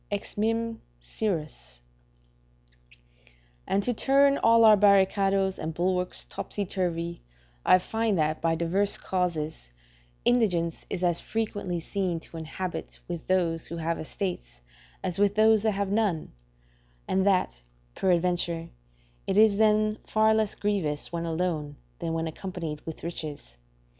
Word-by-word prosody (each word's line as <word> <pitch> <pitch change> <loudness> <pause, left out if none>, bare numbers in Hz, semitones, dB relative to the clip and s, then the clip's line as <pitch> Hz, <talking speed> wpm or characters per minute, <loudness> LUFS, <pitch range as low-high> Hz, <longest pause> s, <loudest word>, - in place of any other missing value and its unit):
Ex 205 -1 -4
Mim. 225 +2 0
P. - - -26 0.2
Syrus.] 150 - -4 1.9
and 200 +1 +1
to 245 - 0
turn 275 +3 +3
all 230 0 +5
our 215 -1 +9
barricadoes 195 -1 +3
and 160 0 -4
bulwarks 180 +1 -1
topsy 205 - -4
turvy, 170 -2 -2 0.4
I - - +6
find 220 +2 -1
that, 155 0 0
by 165 0 +2
divers 180 +5 +1
causes, 160 - -2 0.6
indigence 180 -9 +1
is 180 - -3
as 175 -1 +1
frequently 205 -5 -3
seen 180 0 -2
to 165 - -11
inhabit 170 +3 -5
with 175 -2 -6
those 170 -3 +1
who 170 - -6
have 165 0 -2
estates - - -5 0.4
as 180 0 -2
with 205 0 +3
those 220 0 +5
that 215 0 +1
have 200 0 -2
none; 205 -7 0 0.8
and 190 - +1
that, 180 - +1 0.3
peradventure, 175 - +1 0.6
it 195 - 0
is 215 -2 +6
then 215 0 +3
far 220 0 +3
less 220 -2 +1
grievous 175 -8 -1
when 170 0 -2
alone 160 -3 -2 0.2
than 165 - -3
when 165 0 -1
accompanied 165 -2 -5
with 160 - -7
riches. 155 - -6
185 Hz, 135 wpm, -27 LUFS, 165-205 Hz, 1.9 s, our